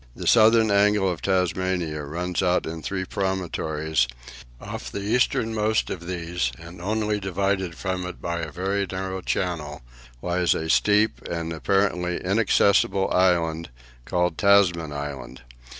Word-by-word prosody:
The - - -7
southern 110 -1 +5
angle 100 0 +3
of 90 -3 -2
Tasmania 90 -4 0
runs 85 +4 -3
out 90 -1 +1
in 80 0 -5
three 95 +3 -3
promontories; 80 -8 -1 0.5
off - - -7
the - - -4
easternmost 110 -1 +1
of 85 -2 -6
these, 85 -7 -2
and 85 +1 -11
only 105 +2 -1
divided 95 -2 -1
from 95 -1 -3
it 90 - -8
by 85 0 -3
a 80 -2 -5
very 95 +4 -1
narrow 95 0 -4
channel, 75 -7 -3 0.4
lies 90 0 +1
a 80 0 -1
steep 105 +1 +3
and 85 -1 -3
apparently 90 +3 0
inaccessible 100 -1 +2
island, 85 -3 +2 0.4
called 90 0 0
Tasman 90 -6 +4
Island. 70 -3 -6
90 Hz, 135 wpm, -24 LUFS, 85-100 Hz, 0.5 s, southern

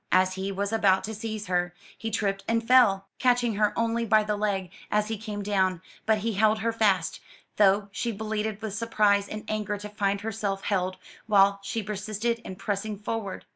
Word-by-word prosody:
As 185 +1 +4
he 190 +1 -3
was 200 +2 -2
about 190 -4 +3
to 220 +3 -4
seize 215 -1 -5
her, 175 -1 -1 0.2
he 225 - -4
tripped 195 -3 -1
and 230 0 0
fell, 225 -7 +5
catching 245 -2 +3
her 210 -1 +3
only 230 0 +1
by 215 -1 +4
the 210 0 -1
leg 200 -4 -1 0.2
as 210 0 +1
he 225 - -1
came 210 -1 -5
down; 190 -3 +1 0.3
but 220 -1 +4
he 230 - 0
held 215 +2 +3
her 230 +1 0
fast, 200 -7 +1 0.4
though 200 0 +4
she 235 +4 -2
bleated 215 0 -3
with 215 -3 -3
surprise 210 -2 +2
and 215 0 -6
anger 210 -1 -2
to 205 +1 -8
find 200 -1 -1
herself 205 -3 -3
held, 185 -2 -1 0.3
while 200 -1 +5
she 200 +3 -3
persisted 215 +3 -2
in 190 -5 -8
pressing 205 +2 -3
forward. 210 -1 -4
210 Hz, 190 wpm, -27 LUFS, 195-220 Hz, 0.4 s, fell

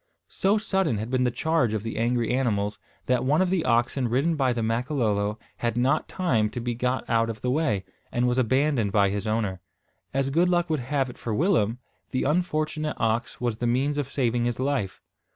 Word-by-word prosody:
So 200 +3 +2
sudden 190 - 0
had 110 +4 -4
been 130 -1 +2
the - - +3
charge 155 -2 +1
of 105 -2 -2
the 115 -1 -4
angry 120 0 +1
animals, 105 -5 0 0.3
that 125 -1 +1
one 145 +4 +2
of 185 -1 +2
the 185 -4 +1
oxen 120 +2 +1
ridden 140 +8 +1
by 135 -4 +2
the 120 -2 -1
Makololo, 110 -3 0 0.2
had 120 -1 -1
not 130 +2 +2
time 120 - +1
to 120 - -5
be 120 0 -2
got 125 +2 -1
out 115 0 +2
of 110 -2 -6
the 125 - 0
way, 115 - 0 0.3
and 120 +1 +1
was 125 +1 +1
abandoned 130 -3 +2
by 100 -1 +3
his 100 +2 -3
owner. 105 -5 -1 0.5
As 135 0 0
good 170 +5 +3
luck 175 -1 +1
would 155 - +1
have 130 0 -1
it - - -17
for 115 -3 -3
Willem, 135 - +2 0.3
the 130 - -1
unfortunate 155 -1 0
ox 115 +1 -1
was 120 -3 -1
the 120 - -1
means 135 +5 +1
of 140 -1 -3
saving 120 -3 +1
his 120 0 -2
life. 130 -8 -1
125 Hz, 205 wpm, -26 LUFS, 115-145 Hz, 0.5 s, the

